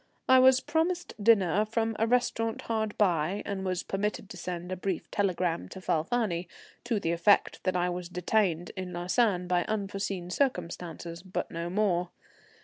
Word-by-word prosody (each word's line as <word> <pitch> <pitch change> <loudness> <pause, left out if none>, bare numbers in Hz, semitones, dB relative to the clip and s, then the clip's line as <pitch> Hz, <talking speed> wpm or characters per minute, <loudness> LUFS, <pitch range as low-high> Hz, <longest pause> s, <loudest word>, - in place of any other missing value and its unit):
I 260 0 +7
was 260 0 +6
promised 330 +4 -1
dinner 205 -3 +4
from 225 +1 -1
a 225 - +2
restaurant 230 -2 0
hard 220 -2 -2
by, 180 -1 +1
and 195 -2 -3
was 185 -1 -1
permitted 205 +1 -3
to - - -7
send 175 0 -5
a - - -1
brief 185 -1 -3
telegram 180 - 0
to - - -8
Falfani, 180 +1 0 0.4
to 235 -3 0
the 165 -4 -1
effect 170 +4 +3
that 185 -1 +1
I 180 0 +2
was 180 -1 -4
detained 180 -1 0
at 185 -1 -4
Lausanne 180 +2 +1
by 180 -1 +2
unforeseen 195 -3 -3
circumstances, 175 - -2
but 185 0 -4
no 170 +1 -4
more. 180 -3 +1
185 Hz, 160 wpm, -29 LUFS, 175-220 Hz, 0.4 s, I